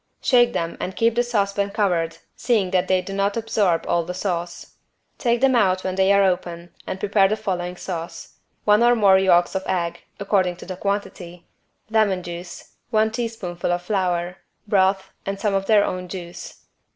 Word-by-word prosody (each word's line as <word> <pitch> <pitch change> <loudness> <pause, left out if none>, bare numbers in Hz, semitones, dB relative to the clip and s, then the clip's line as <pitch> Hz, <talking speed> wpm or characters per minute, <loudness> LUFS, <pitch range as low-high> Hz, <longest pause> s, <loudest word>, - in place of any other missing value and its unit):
Shake 240 -2 +4
them 165 0 -3
and 185 - -4
keep 230 0 +2
the 240 - +2
saucepan 200 -4 0
covered 170 -5 0 0.2
seeing 215 -7 0
that 185 0 +1
they 185 -1 +2
do 195 +2 -7
not 200 +2 0
absorb 210 -6 +1
all 175 0 +2
of 165 - -9
the 180 - -4
sauce. 175 -2 -4 0.5
Take 235 -1 +1
them 265 -1 +4
out 185 -5 +2
when 185 - -2
they 190 +1 +3
are 200 0 +5
open 175 -2 -2
and 190 - -4
prepare 200 -1 +3
the 215 - 0
following 180 -4 -3
sauce: 165 -2 -7 0.3
one 210 +1 +5
or 240 0 +5
more 195 -4 +5
yolks 175 -2 +3
of 190 - -1
egg, 170 -2 -2 0.2
according 190 -3 +1
to - - -12
the 185 - -6
quantity, 180 -3 -4 0.5
lemon 205 -5 +2
juice, 175 0 -9 0.2
one 220 -2 +2
teaspoonful 220 -8 -3
of 175 0 -1
flour, 180 -2 -1 0.3
broth 190 -1 +2
and 195 0 -4
some 210 -1 0
of 195 0 -1
their 215 -2 +5
own 180 0 -4
juice. 175 -1 -9
190 Hz, 185 wpm, -22 LUFS, 175-210 Hz, 0.5 s, are